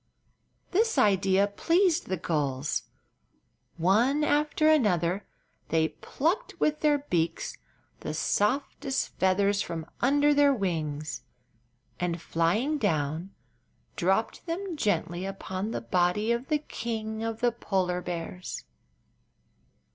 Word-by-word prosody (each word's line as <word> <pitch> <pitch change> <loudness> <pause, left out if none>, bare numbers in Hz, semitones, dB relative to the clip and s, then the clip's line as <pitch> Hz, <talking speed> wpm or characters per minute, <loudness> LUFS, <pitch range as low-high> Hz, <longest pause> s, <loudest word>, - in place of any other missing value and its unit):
This 450 +5 +2
idea 195 -1 +4
pleased 340 - +2
the 185 - -1
gulls. 145 -4 -1 0.9
One 230 - +3
after 300 +1 +2
another 200 - +2 0.4
they 160 -1 +2
plucked 365 - -2
with 305 0 +1
their 300 -2 +3
beaks 170 - -1 0.4
the 155 - -4
softest 265 - 0
feathers 200 +2 +3
from 165 -4 -4 0.2
under 290 +3 +4
their 285 -1 +5
wings, 155 - -2 0.8
and, 175 -1 -1
flying 210 - 0
down, 160 - 0 0.7
dropped - - 0
then 350 +1 -3
gently 180 - 0
upon 195 +1 -4
the 170 - -3
body 180 - +1
of 235 +3 -1
the 305 - +2
King 220 -6 -4
of 225 0 -3
the 240 0 +3
Polar 185 -6 -1
Bears. 175 +1 -5
205 Hz, 110 wpm, -28 LUFS, 175-285 Hz, 0.9 s, their